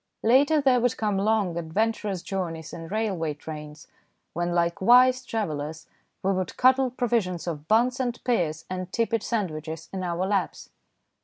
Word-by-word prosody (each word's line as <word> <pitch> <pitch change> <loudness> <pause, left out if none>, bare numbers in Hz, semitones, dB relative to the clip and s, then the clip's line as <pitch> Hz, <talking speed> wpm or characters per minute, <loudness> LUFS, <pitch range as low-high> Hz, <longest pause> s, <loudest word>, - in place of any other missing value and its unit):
Later 280 +7 +4
there 265 -3 +4
would 245 0 +1
come 210 -3 0
long, 200 -4 +1
adventurous 200 +2 -1
journeys 165 -5 -4
in 165 -1 -7
railway 190 -6 -1
trains, 150 0 -9 0.5
when, 175 +1 -1
like 170 0 0
wise 250 +4 +6
travellers, 160 -9 -4 0.4
we 195 +1 +2
would 185 -1 -3
cuddle 260 +1 +4
provisions 230 -8 -1
of 155 -3 -5
buns 245 +4 +3
and 245 -2 -2
pears 170 -11 0
and 185 0 -5
tepid 230 0 0
sandwiches 160 -9 -3
in 190 - -3
our 175 0 -1
laps. 195 -2 -2
190 Hz, 150 wpm, -26 LUFS, 165-230 Hz, 0.5 s, wise